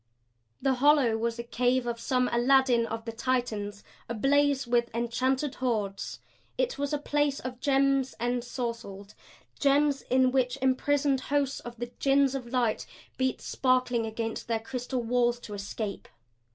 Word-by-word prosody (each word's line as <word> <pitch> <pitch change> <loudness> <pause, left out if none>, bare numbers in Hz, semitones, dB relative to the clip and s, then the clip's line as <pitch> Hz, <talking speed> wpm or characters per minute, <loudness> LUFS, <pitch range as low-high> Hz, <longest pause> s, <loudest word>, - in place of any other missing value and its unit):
The 270 - +3
hollow 285 -6 +5
was 230 +1 -1
a 235 - -4
cave 245 +1 +1
of 235 -1 -3
some 250 +1 +1
Aladdin 245 -1 +4
of 225 0 -5
the 230 - -3
Titans 225 -4 -2 0.3
ablaze 275 +4 +2
with 240 0 +1
enchanted 255 +4 0
hoards. 210 -6 -2 0.4
It - - -1
was 285 0 -1
a 295 - +1
place 290 -1 0
of 255 -1 -6
gems 275 -1 +2
ensorcelled, 235 -4 -4 0.5
gems 285 0 +3
in 255 0 +2
which 255 0 +1
imprisoned 275 +1 +2
hosts 280 0 0
of 240 0 -9
the 240 +1 -5
Jinns 275 -1 +3
of 260 -3 -4
Light 235 -3 0 0.3
beat 260 -1 0
sparkling 255 -3 +1
against 225 0 -4
their 230 -1 0
crystal 250 +1 -4
walls 240 0 +1
to 210 - -8
escape. 200 0 -5
250 Hz, 145 wpm, -28 LUFS, 235-270 Hz, 0.5 s, hollow